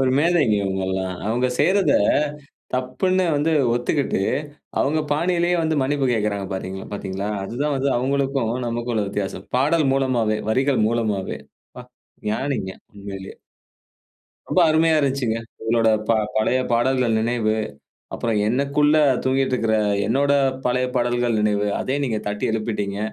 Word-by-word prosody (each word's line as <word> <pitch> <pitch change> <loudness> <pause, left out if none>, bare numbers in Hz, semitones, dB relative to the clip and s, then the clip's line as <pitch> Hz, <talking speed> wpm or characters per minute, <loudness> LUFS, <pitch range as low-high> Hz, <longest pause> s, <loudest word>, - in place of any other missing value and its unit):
ஒரு 130 -1 +2
மேதைங்க 155 -8 +3
இவங்கள்லாம். 95 -1 -2
அவங்க 120 +3 +1
செய்றத 190 +5 +3 0.8
தப்புன்னு 185 +9 0
வந்து 150 +3 +1 0.2
ஒத்துக்கிட்டு 125 -2 0 0.6
அவங்க 155 +3 +1
பாணியிலயே 175 +2 +1
வந்து 160 -1 0
மன்னிப்பு 140 0 0
கேட்கிறாங்க 105 -3 -1
பார்த்தீங் 95 0 -5
பார்த்தீங்களா? 100 0 -4 0.2
அதுதான் 140 +8 -2
வந்து 135 +1 0
அவுங்களுக்கும் 135 -1 0 0.2
நமக்கும் 120 +1 -3
உள்ள 105 -2 0
வித்தியாசம். 100 -1 -4
பாடல் 150 +3 +2
மூலமாவே, 120 -5 +1
வரிகள் 130 +1 +2
மூலமாவே 110 -5 -1 0.9
ஞானிங்க 110 -4 -2 0.2
உண்மையிலயே. 100 -1 -9 1.1
ரொம்ப 185 - +2
அருமையா 160 0 +3
இருந்துச்சுங்க. 135 -5 0 0.2
உங்களோட 115 0 +2 0.5
பழைய 110 +4 +2
பாடல்கள் 120 -1 +2
நினைவு. 115 -2 0 0.6
அப்புறம் 115 -3 -1
எனக்குள்ள 140 +4 +2 0.3
தூங்கிக்கிட்டு 130 0 +1
இருக்கிற 110 -2 +1 0.3
என்னுடைய 140 +4 +2 0.3
பழைய 125 +1 +1
பாடல்கள் 120 -2 +1
நினைவு 105 -1 +1
அதையும் 140 +2 -1
நீங்க 115 -4 -1
தட்டி 105 0 -2
எழுப்பிட்டீங்க. 105 -3 -2
120 Hz, 120 wpm, -22 LUFS, 110-140 Hz, 1.1 s, மேதைங்க